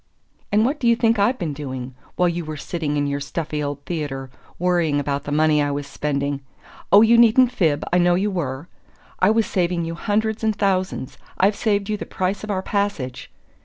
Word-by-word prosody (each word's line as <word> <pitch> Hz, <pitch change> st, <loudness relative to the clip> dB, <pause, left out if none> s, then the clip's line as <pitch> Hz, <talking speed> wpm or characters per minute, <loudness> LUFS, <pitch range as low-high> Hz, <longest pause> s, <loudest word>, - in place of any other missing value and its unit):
"And 210 Hz, +2 st, +3 dB
what 285 Hz, +4 st, -1 dB
do 240 Hz, -, 0 dB
you 235 Hz, -, +5 dB
think 230 Hz, -2 st, +2 dB
I've 240 Hz, +6 st, +2 dB
been 165 Hz, -, -3 dB
doing? 130 Hz, -3 st, -6 dB, 0.2 s
While 180 Hz, -, +3 dB
you 170 Hz, 0 st, -3 dB
were 155 Hz, -1 st, -6 dB
sitting 150 Hz, -1 st, -3 dB
in 145 Hz, -, +1 dB
your 140 Hz, 0 st, -1 dB
stuffy 150 Hz, +2 st, -4 dB
old 145 Hz, -1 st, -4 dB
theatre, 140 Hz, -6 st, -4 dB, 0.3 s
worrying 170 Hz, -5 st, +1 dB
about 140 Hz, 0 st, -2 dB
the 145 Hz, -, -4 dB
money 155 Hz, 0 st, +3 dB
I 145 Hz, -, 0 dB
was 145 Hz, 0 st, -3 dB
spending 140 Hz, 0 st, -2 dB, 0.5 s
(oh, 205 Hz, +2 st, +8 dB
you 230 Hz, +1 st, +5 dB
needn't 240 Hz, +2 st, +6 dB
fib 160 Hz, -11 st, +1 dB
I 180 Hz, -, +5 dB
know 175 Hz, 0 st, +4 dB
you 200 Hz, +3 st, 0 dB
were!) 145 Hz, -4 st, -3 dB, 0.5 s
I 185 Hz, -, +4 dB
was 220 Hz, 0 st, +3 dB
saving 175 Hz, -2 st, 0 dB
you 165 Hz, -, -4 dB
hundreds 215 Hz, +5 st, -1 dB
and 220 Hz, -1 st, +1 dB
thousands. 190 Hz, -8 st, -1 dB, 0.2 s
I've 200 Hz, +2 st, +3 dB
saved 205 Hz, -3 st, 0 dB
you 215 Hz, -1 st, -1 dB
the -, -, -7 dB
price 185 Hz, +3 st, -2 dB
of 215 Hz, -, -6 dB
our 190 Hz, -2 st, -1 dB
passage!" 200 Hz, -13 st, -2 dB
175 Hz, 205 wpm, -22 LUFS, 145-205 Hz, 0.5 s, oh